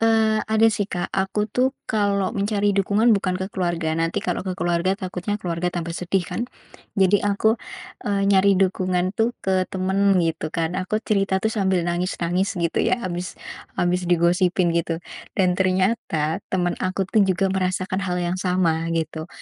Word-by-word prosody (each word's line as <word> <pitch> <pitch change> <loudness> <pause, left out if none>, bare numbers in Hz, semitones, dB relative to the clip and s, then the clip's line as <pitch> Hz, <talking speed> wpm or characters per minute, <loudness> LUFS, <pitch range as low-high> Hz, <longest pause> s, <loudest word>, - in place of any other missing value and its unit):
eee, 220 -1 +3
ada, 220 +1 +4
sih, 205 -1 -1
Kak, 175 -2 -3
aku 195 +2 0
tuh, 260 +5 +1 0.2
kalau 200 -2 +1
mencari 205 0 +1
dukungan 200 +4 +3
bukan 190 -3 +1
ke 190 +1 -3
keluarga. 170 -3 -1
Nanti 165 0 -1
kalau 180 - -1
ke 185 - -1
keluarga 175 +1 +1
takutnya 185 +1 -3
keluarga 175 -2 -1
tambah 170 -1 -3
sedih 180 +2 -1
kan. - - -4 0.6
Jadi 195 0 +4
aku, 210 +3 +2 0.5
eee, 200 -1 +1
nyari 200 0 +5
dukungan, 185 -1 +1
tuh, 230 +3 0
ke 185 -1 +1
temen 190 +1 +2
gitu 160 -1 -1
kan. 165 0 0
Aku 190 +3 -1
cerita, 195 -2 +1
tuh, 220 - +1
sambil 190 -4 +1
nangis-nangis, 180 +2 -1
gitu 170 -1 0
ya, 240 - +1
habis 180 0 -4 0.4
habis 180 0 0
digosipin 175 +1 +3
gitu. 170 0 -1 0.4
Dan 185 -2 +3
ternyata, 185 -4 +1
teman 175 -2 0
aku 185 +1 -1
tuh 215 - +3
juga 190 0 +1
merasakan 185 0 -1
hal 180 -3 -2
yang 175 +1 -1
sama, 170 -3 +1
gitu. 160 0 -3
185 Hz, 165 wpm, -23 LUFS, 175-200 Hz, 0.6 s, nyari